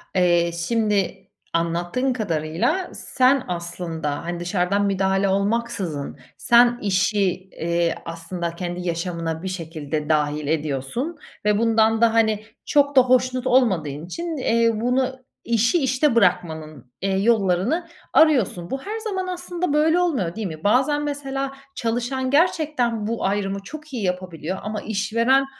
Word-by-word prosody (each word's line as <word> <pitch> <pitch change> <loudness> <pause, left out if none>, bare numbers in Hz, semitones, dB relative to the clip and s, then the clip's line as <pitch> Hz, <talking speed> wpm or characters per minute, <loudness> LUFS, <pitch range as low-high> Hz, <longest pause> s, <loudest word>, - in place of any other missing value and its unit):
Eee, 175 -2 +3
şimdi, 195 +1 0 0.3
anlattığın 175 +10 0
kadarıyla 180 - -1
sen 260 0 +2
aslında, 170 -4 -4
hani, 175 0 -4
dışarıdan 180 +3 0
müdahale 195 0 +1
olmaksızın 200 -6 -1 0.2
sen 240 0 +5
işi, 200 0 +2 0.2
eee, 170 0 0
aslında 170 +1 -5
kendi 175 0 -4
yaşamına 165 -1 -3
bir - - -3
şekilde 160 -4 -4
dâhil 150 -1 +1
ediyorsun 155 - -2 0.3
ve 210 -1 +3
bundan 225 0 +3
da, 230 -1 +5
hani, 220 -1 +2 0.2
çok 285 -1 +2
da 260 - +9
hoşnut 255 0 +2
olmadığın 175 - +2
için, 335 - -4
eee, 230 -3 +2
bunu 255 +1 -1 0.2
İşi 235 +7 +3
işte 260 +1 +2
bırakmanın, 155 - 0
eee, 190 0 0
yollarını 215 - +2 0.3
arıyorsun. 250 - +3
Bu 270 0 -3
her 430 +2 -4
zaman 385 -4 -3
aslında 355 -2 -3
böyle 320 +3 +3
olmuyor, 255 - 0
değil 220 -3 -3
mi? 160 -2 -8
Bazen 265 +7 +2
mesela 275 -2 -3 0.2
çalışan 245 +3 -1
gerçekten 285 -9 +1
bu 230 -2 -2
ayrımı 200 0 -1
çok 305 +3 -10
iyi 235 -5 -3
yapabiliyor 180 -1 -3
ama 210 0 -4
işveren 230 +6 +2
210 Hz, 130 wpm, -23 LUFS, 175-255 Hz, 0.3 s, da